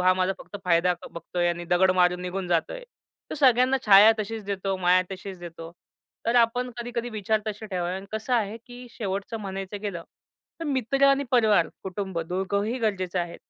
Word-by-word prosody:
हा 185 0 +5
माझा 185 +1 +1
फक्त 205 - -9
फायदा 180 +1 +3 0.2
बघतोय 175 +1 -2
आणि 175 0 -3
दगड 185 +1 +5
मारून 180 0 +3
निघून 180 0 -4
जातोय. 175 - -1 0.5
तो - - -3
सगळ्यांना 260 -2 +4
छाया 205 +2 +9
तशीच 215 0 -4
देतो, 195 -1 -2
माया 185 0 +4
तशीच 190 0 -8
देतो. 165 -1 -9 0.6
तर 230 - +1
आपण 245 +1 +2
कधी-कधी 240 0 -4
विचार 215 0 0
तसे 215 0 -5
ठेवावे 180 -3 -2
आणि 195 +1 -8
कसं 220 +3 -1
आहे 220 -1 0
की 245 0 -11
शेवटचं 200 0 -4
म्हणायचं 195 0 -5
गेलं 195 -5 -4 0.6
तर - - -3
मित्र 275 -1 +1
आणि 275 +1 +3
परिवार, 215 -8 +4
कुटुंब 190 -1 -4
दोघंही 200 +6 -1
गरजेचं 190 -5 -1
आहे. 170 0 -5
200 Hz, 175 wpm, -26 LUFS, 180-230 Hz, 0.6 s, छाया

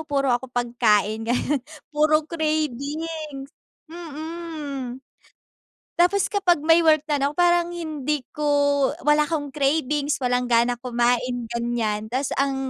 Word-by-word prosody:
puro 280 -3 0
ako 245 +1 0
pagkain, 225 -3 +1
ganun. 250 +4 0 0.3
Puro 305 +1 +2
cravings 305 -1 -3 0.4
mm. 310 -5 -6 1.0
Tapos 365 +3 +3
kapag 370 -5 +2
may 325 +3 +4
work 310 -2 +4
na 295 -2 0
no 280 - +1
parang 345 +1 +2
hindi 305 -4 -3 0.2
ko 300 - -4 0.6
wala 295 0 +5
akong 300 -1 -2
cravings, 290 +1 0
walang 250 -1 +1
gana 240 +1 +3
kumain, 245 0 0
ganyan. 230 -2 -2
Tapos 260 +2 -1
ang 275 0 +1
290 Hz, 120 wpm, -23 LUFS, 245-315 Hz, 1.0 s, wala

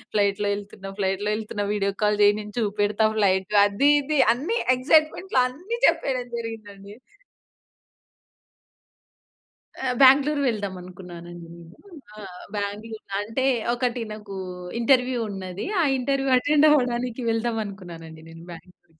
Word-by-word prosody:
ఫ్లైట్‌లో 205 0 +1
వెళ్తున్న 200 -1 -9
ఫ్లైట్‌లో 195 +2 -1
వెళ్తున్న 210 -1 -4
వీడియొ 200 -1 -1
కాల్ 210 0 +2
చేయి 205 0 +5
నేను 210 -1 -10
చూపెడతా. 205 0 0
ఫ్లైట్ 190 0 +2
అది 205 +8 +2
ఇది 295 +1 -1 0.2
అన్ని 340 - -2 0.2
ఎగ్జైట్మెంట్‌లో 310 +5 +2
అన్ని 360 - -6
చెప్పేయడం 270 -7 0
జరిగింది 225 -3 -7
అండి. 200 +1 -13 2.9
ఆ! 265 - 0 0.2
బాంగ్లోర్ 285 +2 +5
వెళ్దాం 205 -4 -3
అనుకున్నానండి 175 -1 -11
నేను. 170 +2 -15 0.4
ఆ! - - -11 0.4
బాంగ్లోర్ 210 +2 -5 0.2
అంటే 225 +6 -2 0.3
ఒకటి 245 -1 -2
నాకు 210 -2 -9 0.4
ఇంటర్వ్యూ 250 +1 +2
ఉన్నది. 190 -1 -6 0.2
ఆ - - +3 0.2
ఇంటర్వ్యూ 270 +1 -1
అటెండ్ 295 +3 +3
అవ్వడానికి 250 -3 0
వెళ్దాం 225 0 -1
అనుకున్నానండి. 170 -5 -10
నేను 165 0 -12
బాంగ్లోర్ 180 +2 -14
210 Hz, 120 wpm, -24 LUFS, 195-255 Hz, 2.9 s, చేయి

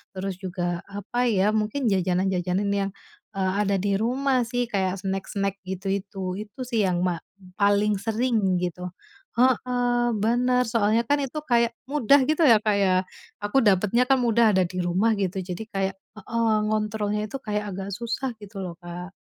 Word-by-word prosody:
terus 190 0 -3
juga 175 -2 -3
apa 205 +5 -2
ya? 200 -1 +3
Mungkin 220 +5 -1
jajanan-jajanan 185 +1 0
yang, 195 -1 -1 0.5
eee, 190 -1 +1
ada 200 -1 +1
di 200 -1 +1
rumah 260 +2 +1
sih 245 0 -1
kayak 190 -3 0
snack-snack 195 +1 -2
gitu 190 +1 -5
itu, 195 -1 -4
itu 265 - -24
sih 230 -4 +1
yang 175 0 0
ma 175 -2 -1 0.4
paling 205 +1 +3
sering 225 -4 +1
gitu. 180 0 -3 0.5
Heeh, 245 -1 +2
benar, 250 +2 +2
soalnya 225 +1 +2
kan 290 - +5
itu 275 +3 -4
kayak 235 -1 +4 0.2
mudah 280 -1 +4
gitu 315 +1 +2
ya, 230 -7 +7
Kak, 210 -1 +1
ya 195 -2 +3 0.5
aku 205 +6 0
dapatnya 210 +4 +3
kan 270 - +5
mudah 235 -2 +4
ada 185 - +4
di 185 - -8
rumah 185 +6 +2
gitu 190 -1 -2
jadi 185 +3 -5
kayak 195 0 -1 0.2
heeh, 230 +2 -1 0.2
ngontrolnya 210 -1 -1
itu 275 - -5
kayak 210 -4 -2
agak 195 +1 -5
susah 240 +3 -2
gitu 200 0 -9
loh 175 -2 -6
Kak. 175 +2 -7
205 Hz, 165 wpm, -25 LUFS, 190-235 Hz, 0.5 s, ya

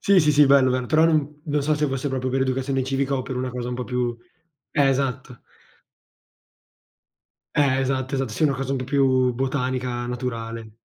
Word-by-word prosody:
Sì, 200 -2 +4
sì, 150 -1 +3
sì, 150 0 +6
bello, 135 -2 +5
bello, 125 -1 -1
però 155 +4 +4
non 150 -2 +1
non 145 -1 0
so 155 +2 +1
se 150 0 0
fosse 135 0 -2
proprio 130 -1 -2
per 130 +1 +1
educazione 135 0 -1
civica, 135 +1 -1
o 130 - -2
per 125 0 -5
una 130 0 -2
cosa 125 0 -5
un - - -3
po' 125 0 -4
più 125 -2 -2 0.5
eh, 140 -2 +3
esatto. 130 -2 -2 2.1
Eh, 135 -3 +3
esatto, 130 0 -1
esatt 135 -2 -1
sì, 135 - -2
una 145 -3 +3
cosa 135 +1 -3
un - - 0
po' 130 - -4
più, 130 -2 +2
botanica, 125 -1 -2
naturale. 115 -3 -5
130 Hz, 195 wpm, -23 LUFS, 125-140 Hz, 2.1 s, sì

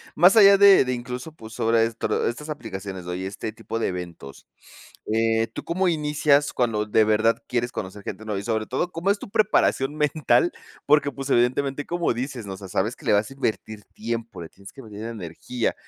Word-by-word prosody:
Más 180 +7 +6
allá 200 -1 +8
de 200 -8 +7
de 130 - -1
incluso, 125 +5 -6
pues, 110 -7 -12
sobre 115 -1 +2
estro 115 0 -1
estas 150 +6 -5
aplicaciones 95 -9 -6
o 90 - -4
y 95 +1 -4
este 105 +3 -5
tipo 115 0 -6
de - - 0
eventos, 85 -6 -7 0.7
eh, 115 0 +2
¿tú - - -7
cómo 185 +2 0
inicias 150 -2 +2
cuando 110 -4 0
de 110 +1 +3
verdad 110 +2 +2
quieres 120 0 -1
conocer 100 +1 -6
gente 105 +3 -6
nueva? 105 -2 -3
Y - - -9
sobre 110 -2 -1
todo, 175 +8 -2
¿cómo 175 +4 -1
es 200 - +2
tu - - -9
preparación 185 -9 +2
mental? 150 0 +2 0.3
Porque, 145 -1 +4
pues, 135 0 -6
evidentemente, 135 +4 +1
como 175 -4 0
dices, 125 -2 -5
¿no? 95 - -5
O - - -8
sea, 95 -1 -10
sabes 105 +6 -1
que - - -16
le - - +3
vas 105 +3 +2
a - - -10
invertir 110 -5 -3
tiempo, 115 -4 -5
le 80 - -8
tienes 100 0 -15
que 135 - -12
meter 105 -1 -9
energía. 110 +3 -4
115 Hz, 210 wpm, -24 LUFS, 105-145 Hz, 0.7 s, allá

